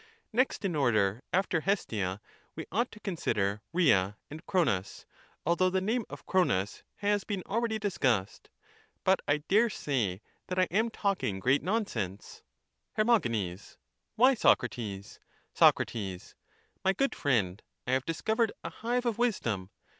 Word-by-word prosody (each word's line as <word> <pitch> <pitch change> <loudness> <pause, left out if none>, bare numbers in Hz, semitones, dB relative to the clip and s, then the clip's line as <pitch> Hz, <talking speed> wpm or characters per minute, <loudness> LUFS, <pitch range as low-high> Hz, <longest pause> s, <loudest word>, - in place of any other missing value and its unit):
Next 250 -3 +1
in 180 -4 0
order 110 -6 +2
after 180 -3 +1
Hestia 105 - -1 0.3
we - - -5
ought 235 +5 +1
to 215 - -12
consider 105 - -1
Rhea 105 - +3
and 155 +3 -8
Cronos, 115 - 0 0.4
although 170 +3 +3
the 190 +1 +1
name 220 +4 -1
of - - -10
Cronos 110 - +1
has 205 0 0
been 200 -4 -3
already 225 +1 0
discussed. 135 - -1 0.5
But 190 0 +4
I 145 +1 +1
dare 220 +4 +4
say 110 - -2 0.2
that 180 - -3
I 185 - +5
am 220 +5 +2
talking 195 - -1
great 130 +7 +3
nonsense. 185 - -3 0.5
Her. 215 - +2
Why, 115 - 0
Socrates? 110 - 0 0.3
Soc. - - +6 1.0
My 190 - +3
good 275 0 +1
friend, 105 -8 0 0.2
I 125 - -2
have 130 0 +2
discovered 220 +8 +1
a - - -5
hive 245 +2 -2
of 235 -2 -1
wisdom. 115 - 0
170 Hz, 135 wpm, -30 LUFS, -, 1.0 s, Soc